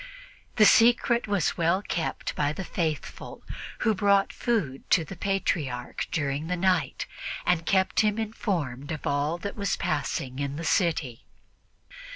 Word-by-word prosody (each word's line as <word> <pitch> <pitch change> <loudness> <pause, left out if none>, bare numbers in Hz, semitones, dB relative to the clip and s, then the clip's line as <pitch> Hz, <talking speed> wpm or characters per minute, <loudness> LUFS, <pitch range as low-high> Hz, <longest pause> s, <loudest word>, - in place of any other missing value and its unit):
The 215 - +6
secret 235 +2 +5
was 200 -6 0
well 170 +4 +2
kept 165 -4 -3
by 145 0 +1
the 190 - -5
faithful, 160 -4 -4 0.4
who 220 - +3
brought 200 -1 +3
food 190 - -2
to 165 - +4
the 195 - -8
Patriarch 160 -10 -2
during 145 0 -1
the 180 +1 -1
night 185 -2 +1 0.4
and 170 -2 +1
kept 190 -1 +2
him 210 -1 +3
informed 170 - -3
of 155 - -5
all 145 +4 0
that 200 +3 -5
was 200 -2 0
passing 135 -3 -2
in 140 0 -2
the 165 +2 -5
city. 155 - 0
170 Hz, 145 wpm, -27 LUFS, 145-200 Hz, 0.4 s, The